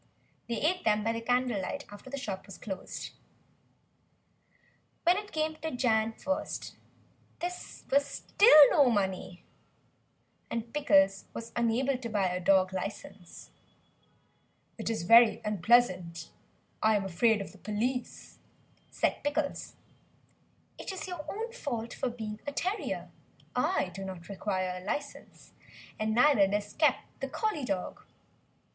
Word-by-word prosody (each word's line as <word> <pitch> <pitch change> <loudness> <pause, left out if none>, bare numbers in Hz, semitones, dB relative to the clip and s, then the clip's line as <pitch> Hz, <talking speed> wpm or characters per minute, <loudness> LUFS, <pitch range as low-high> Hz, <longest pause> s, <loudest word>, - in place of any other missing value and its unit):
They 235 - 0
ate 360 +4 +1
them 210 -1 +2
by 230 +1 0
candle 245 -2 +1
light 280 +9 -5
after 205 +5 -11
the 280 - -4
shop 195 -7 -5
was 195 - -10
closed. 190 -3 -6 1.9
When 350 +1 +5
it 410 +1 -5
came 315 0 -1
to 320 - -4
Jan. 225 -4 +1
1st 285 +5 -3 0.7
there 350 +1 -2 0.4
was 280 +1 +5
still 310 - +6
no 280 -4 +5
money, 190 -4 -2 1.1
and 230 0 -4
Pickles 195 -9 +3
was 230 0 -6
unable 245 +3 +1
to 235 -3 -5
buy 200 -4 +1
a 180 0 -2
dog 185 0 +3
licence. 190 -1 -7 1.3
"It - - -2
is 220 -6 -2
very 230 +4 +7
unpleasant, 185 -5 +2 0.5
I 220 0 +4
am 200 -2 0
afraid 210 +4 +2
of 195 - -6
the 195 - -17
police," 240 +5 -3 0.5
said - - -1
Pickles. 290 0 -2 1.0
"It - - -5
is 380 - -6
your 355 -4 -5
own 450 +3 -4
fault 235 - -4
for 260 - -2
being 220 -3 -6
a - - -1
terrier; 370 +8 -3 0.4
I 250 - +1
do 195 +2 -6
not 185 -2 -8
require 185 -2 -2
a - - -13
licence, 285 +8 -6 0.5
and 215 0 0
neither 250 -5 +5
does 205 +1 -2
Kep, 295 -5 +3 0.2
the 270 - -4
Collie 335 - -2
dog." 195 -6 -3
230 Hz, 135 wpm, -30 LUFS, 195-280 Hz, 1.9 s, very